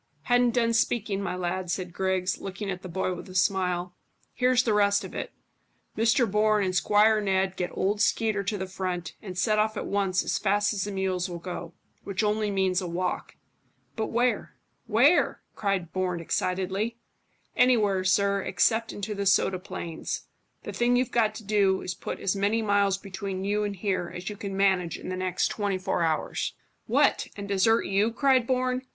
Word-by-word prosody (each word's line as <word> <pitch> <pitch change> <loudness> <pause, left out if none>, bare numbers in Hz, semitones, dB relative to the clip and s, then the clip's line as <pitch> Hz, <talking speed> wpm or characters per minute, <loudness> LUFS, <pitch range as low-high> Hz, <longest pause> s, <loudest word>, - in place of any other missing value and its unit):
"Hadn't 245 -1 +3
done 230 -1 +2
speaking, 220 -3 0
my 180 -2 -2
lad," 180 0 -3
said 180 0 -3
Griggs, 185 -1 0
looking 195 +1 -5
at 180 -1 -5
the 185 - -8
boy 185 +1 -1
with 180 - -9
a 185 - -10
smile. 180 -1 +1 0.4
"Here's 250 0 +3
the 225 - +1
rest 200 -1 +3
of - - -8
it. - - -5 0.6
Mr 230 +3 +3
Bourne 210 0 +2
and 185 -1 -2
Squire 210 +4 +4
Ned 190 -1 0
get 180 -1 -2
old 205 +2 0
Skeeter 215 -1 +1
to 205 +2 -1
the 190 - -3
front; 185 -2 -4
and 185 -3 -8
set 215 +4 +2
off 215 0 +1
at - - -3
once 195 -2 0
as - - -1
fast 205 +1 +2
as 200 -2 -2
the 205 - -4
mules 190 -1 -1
will 175 - -5
go, 175 -1 -7 0.3
which 200 +2 -2
only 210 0 +1
means 190 -2 +1
a 180 - -4
walk." 180 +2 -3 0.6
"But 220 - -1
where 245 +2 0 0.3
where?" 250 +10 +3
cried 195 -5 -1
Bourne 185 -2 -1
excitedly. 190 +6 -1 0.6
"Anywhere, 215 -7 +3
sir, 200 +1 +2
except 225 +5 +1
into 210 +1 -4
the 200 -1 -2
soda 190 -1 +3
plains. 175 -3 -5 0.4
The - - -6
thing 240 +1 +2
you've 250 0 +1
got 220 -3 +2
to 220 - -8
do 200 -2 +2
is 180 - -3
to - - -21
put - - -5
as 195 - 0
many 205 +3 +1
miles 200 -2 +2
between 195 -1 -5
you 205 +1 0
and 205 -1 -2
here 185 -3 -2
as 180 +3 -5
you - - -7
can 200 -2 -5
manage 190 -4 +2
in - - -8
the 185 - -2
next 185 -1 0
twenty 200 -3 -1
four 185 -1 -1
hours." 160 -2 -1 0.3
"What, - - +3
and 200 0 -6
desert 200 +3 +3
you?" 200 +4 +1
cried 255 -1 +3
Bourne. 255 0 0
195 Hz, 190 wpm, -27 LUFS, 185-215 Hz, 0.6 s, Squire